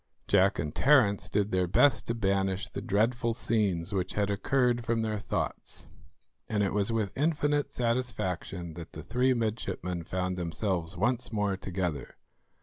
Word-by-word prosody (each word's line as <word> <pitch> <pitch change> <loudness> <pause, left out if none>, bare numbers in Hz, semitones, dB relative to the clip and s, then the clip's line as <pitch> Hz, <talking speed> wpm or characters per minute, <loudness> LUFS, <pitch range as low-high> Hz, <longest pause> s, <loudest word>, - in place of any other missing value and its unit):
Jack 100 0 +4
and 75 0 -3
Terence 125 -8 +4
did 105 0 0
their 90 -1 +1
best 135 +11 +3
to 115 - -1
banish 95 -2 0
the - - -6
dreadful 115 +4 +1
scenes 100 -6 0
which 95 -2 -1
had 100 -1 0
occurred 120 +3 +1
from 115 0 0
their 110 -1 -1
thoughts, - - -4 0.6
and 105 -2 +1
it 100 - 0
was 105 +1 +1
with 110 -3 0
infinite 145 -1 +1
satisfaction 110 - -2
that 80 0 -9
the 80 - -8
three 125 +5 +2
midshipmen 105 -6 -2
found 90 +1 -2
themselves 85 0 -2
once 120 +4 0
more 105 -3 0
together. 90 -6 -4
105 Hz, 150 wpm, -29 LUFS, 90-120 Hz, 0.6 s, Jack